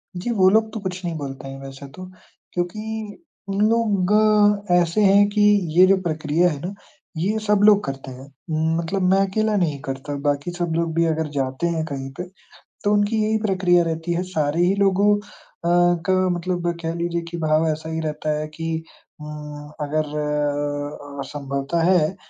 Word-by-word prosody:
जी, 180 +7 -4
वो 190 -4 +5
लोग 220 +1 +2
तो 220 - -4
कुछ 185 -2 -5
नहीं 170 -2 -2
बोलते 135 -2 -6
हैं 135 0 -8
वैसे 135 +1 -9
तो, 185 +7 -10 0.5
क्योंकि 215 - -4 0.3
उन 195 +1 -1
लोग 210 -1 +3
ऐसे 175 +3 +3
हैं 200 +1 +6
कि 210 0 0 0.4
ये 185 - +9
जो 195 - +5
प्रक्रिया 160 0 +1
है 145 -3 -4
ना, 185 +3 -4 0.4
ये 205 +6 0
सब 210 -1 +4
लोग 205 -1 +6
करते 135 -1 -6
हैं। 130 +2 -11 0.5
मतलब 170 +4 -2
मैं 195 - +4
अकेला 215 +2 0
नहीं 160 -7 0
करता, 135 +2 -5
बाकी 145 +3 -1
सब 175 -2 -2
लोग 165 -1 0
भी 170 0 +3
अगर 160 -1 0
जाते 130 +5 -1
हैं 165 -2 -1
कहीं 135 -3 -5
पे, 180 - -3 0.6
तो 205 0 +2
उनकी 210 +1 +2
यही 220 +1 +1
प्रक्रिया 180 -3 +3
रहती 165 +1 -2
है, 175 +2 -1
सारे 160 -2 -1
ही 190 - +2
लोगों 200 +1 +3 0.5
अ, - - +2 0.4
का 190 - +2 0.2
मतलब 175 0 -1
कह 165 0 -2
लीजिए 170 0 -2
कि 170 - -5
भाव 155 0 +2
ऐसा 155 +1 -3
ही 160 0 -3
रहता 155 -1 -3
है 155 - -4
कि 165 +1 -5 0.5
उम, 150 -1 -8
अगर 155 +1 0
अ 145 -1 -2
अ, - - -2
संभवतः 140 +3 -3
है, 180 0 +2
170 Hz, 180 wpm, -22 LUFS, 150-195 Hz, 0.6 s, ये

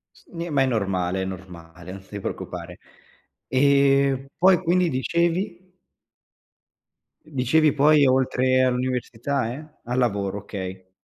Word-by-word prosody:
S - - -23
ne 170 0 -5
ma 140 - +2
è 135 - +4
normale, 95 -5 -1
è - - -3
normale, 90 -2 -10
non 95 0 -10
ti 100 - -7
preoccupare. - - -6 0.7
Ehm, 140 0 +3
poi 185 0 +5
quindi 175 0 +2
dicevi? 175 +6 -1 1.5
Dicevi 150 +1 +2
poi 145 0 +4
oltre 130 0 +2
all'università, 125 0 -1
e? 150 +3 -9 0.2
A 125 +1 -3
lavoro, 100 -5 0
okay. 95 -2 -8
130 Hz, 120 wpm, -23 LUFS, 100-150 Hz, 1.5 s, poi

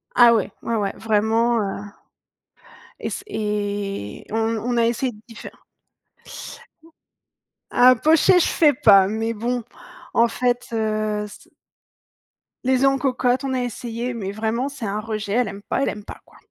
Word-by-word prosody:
Ah 240 -1 +7
ouais, 205 -3 0
ouais, 230 - -1
ouais, 205 -3 -1
vraiment, 225 +2 +1
heu 200 0 -4 1.2
et - - -3
c'est 390 - -5
et 205 - -3
on 225 0 0
on 240 +2 -2
a 230 - +4
essayé 240 +2 0 0.2
d'y 230 - -13
faire - - -11 2.1
Ah, 250 +1 +6
pochés, 320 +7 +4
je - - +2
fais 300 -3 +4
pas, 195 -6 +6
mais 225 +2 -2
bon 240 +2 -2 0.5
en 235 +1 +4
fait, 245 +1 -1
heu, 215 -1 -1
c - - -15 1.1
Les 260 +1 +2
œufs 275 - +6
en 270 - 0
cocotte, 255 -1 0
on 270 - -2
a 255 - 0
essayé, 240 +1 -4
mais 195 -3 -4
vraiment 225 +5 -2
c'est 275 -5 -6
un 205 +1 -2
rejet, 215 -2 -4
elle 245 -1 +2
aime 200 0 -7
pas, 270 - -1
elle - - +1
aime 210 0 -7
pas, - - -9
quoi. - - -21
230 Hz, 165 wpm, -22 LUFS, 210-250 Hz, 2.1 s, Ah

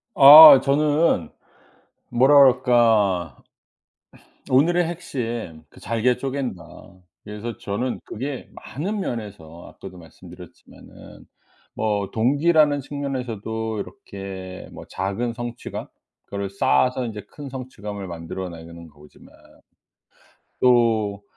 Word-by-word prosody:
아 145 0 +11
저는 145 - +1 0.8
뭐라 130 +4 +3
그럴까. 115 - +3 1.1
오늘의 175 +7 +3
핵심 120 - -6
그 - - -18
'잘게 115 +2 0
쪼갠다.' 130 -10 -5 0.6
그래서 105 +2 -7
저는 110 +5 -4
그게 130 +3 -7
많은 195 +10 -6
면에서 100 - -7
아까도 90 - -12
말씀드렸지만은 80 -3 -15 0.5
뭐 105 -2 -2
동기라는 145 +4 +2
측면에서도 115 -6 -5
이렇게 95 - -9
뭐 - - -11
작은 100 +6 -3
성취감? 120 0 -7 0.4
그거를 100 -1 -5
쌓아서 120 - +1
이제 105 -3 -8
큰 145 -2 -10
성취감을 105 -7 -8
만들어내는 85 -1 -9
거지만 75 0 -19 1.3
또 115 -5 +2
115 Hz, 230 characters per minute, -22 LUFS, 100-135 Hz, 1.3 s, 아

